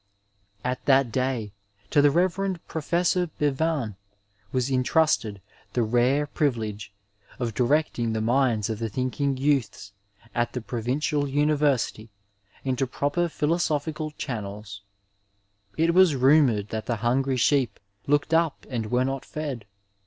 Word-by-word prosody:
At 125 0 -2
that 135 -3 +4
day, 125 -5 -1 0.4
to 145 - +5
the 145 - +6
Rev. 185 +4 +1
Prof. 170 +3 0 0.2
Bevan 145 - 0 0.6
was 130 +1 0
intrusted 130 - +1 0.3
the 120 - +2
rare 125 +6 +2
privilege 110 - -2 0.5
of 120 -3 -2
directing 125 -2 +1
the 110 - -1
minds 115 -2 +2
of 110 - -4
the 115 -1 -2
thinking 130 +4 -1
youths 135 -7 -1 0.4
at 120 0 -1
the 125 - -3
Provincial 130 +6 -1
University 145 -6 +1 0.5
into 130 0 0
proper 145 +7 -1
philoso 160 0 +1
phical 155 +1 -5
channels. 100 -4 -6 1.0
It 165 +1 +3
was 180 -4 +5
rumoured 130 -6 +4
that 110 -1 -4
the 120 - 0
hungry 130 +2 +1
sheep 130 -1 +2 0.3
looked 145 +3 +1
up 165 -2 +1
and 115 -4 -2
were 125 +2 +2
not 135 0 -3
fed. 145 -8 -5
135 Hz, 130 wpm, -25 LUFS, 115-150 Hz, 1.0 s, the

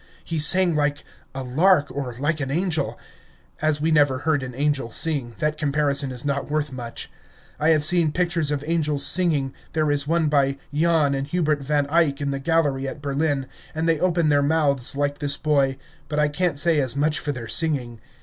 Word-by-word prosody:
He 165 -2 -4
sang 175 +2 +5
like 145 -1 -1 0.3
a 135 - -4
lark, 145 +3 +2
or 130 -3 -5
like 155 +4 -1
an 135 -2 -3
angel. 160 -1 -1 0.6
As 155 -1 +1
we 160 +2 0
never 145 -4 +3
heard 150 0 -1
an 130 -1 -7
angel 140 -3 -1
sing, 130 -3 0
that 150 0 -2
comparison 140 -2 0
is 125 +1 -9
not 140 0 -2
worth 150 -1 -2
much. 120 -3 -6 0.5
I 155 +2 +2
have 155 -2 +2
seen 170 -1 +3
pictures 170 -3 0
of 145 -1 -2
angels 150 -3 +2
singing, 150 -7 +3 0.2
there 155 -2 0
is 145 0 +1
one 165 0 +1
by 140 -2 +1 0.2
Jan 155 -2 +2
and 135 0 -3
Hubert 150 -2 -1
Van 145 +1 0
Eyck 160 -4 +2
in 140 -1 -2
the 135 - -3
gallery 145 -3 0
at 140 - -7
Berlin, 140 -1 -2 0.3
and 160 +1 -1
they 165 -2 +1
open 170 -3 +1
their 145 -1 +3
mouths 140 -4 +1
like 145 0 -2
this 145 -1 0
boy, 140 -3 0 0.3
but 150 - -3
I 150 0 +2
can't 165 0 -1
say 160 +1 +3
as 130 -3 -1
much 150 +2 +1
for 150 - -3
their 120 -4 -7
singing. 130 -8 +2
145 Hz, 200 wpm, -22 LUFS, 140-160 Hz, 0.6 s, sang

